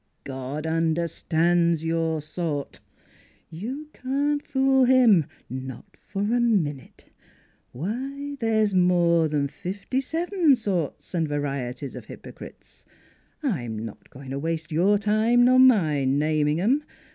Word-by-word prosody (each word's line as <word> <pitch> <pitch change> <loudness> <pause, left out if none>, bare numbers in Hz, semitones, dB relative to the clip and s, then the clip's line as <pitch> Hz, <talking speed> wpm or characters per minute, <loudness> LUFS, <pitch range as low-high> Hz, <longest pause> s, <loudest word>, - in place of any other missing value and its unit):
God 135 +3 -5
understands 165 0 +1
your 165 -2 -1
sort. 155 -3 -4 0.7
You 255 - -6
can't 285 +3 -1
fool 265 -1 +3
him, 240 - +5 0.2
not 130 -1 -8
for 200 0 -3
a 235 +4 +1
minute.... 170 - -1 0.6
Why, 270 - -5
there's 220 -3 +1
more 175 -2 +3
'n 145 -2 +1
fifty 195 - -4
seven 330 +1 +2
sorts 190 - -3
and 165 -3 0
varieties 140 -2 -4
of - - -8
hypocrites; - - -12 0.6
I'm 125 - -2
not 110 - -11
going 135 0 -10
to 135 - -3
waste 160 +1 -3
your 185 +6 +3
time 215 +4 +3
nor 255 +1 +5
mine 155 - +4
naming 150 +1 +1
'em. 255 +11 +2
175 Hz, 120 wpm, -25 LUFS, 150-245 Hz, 0.7 s, him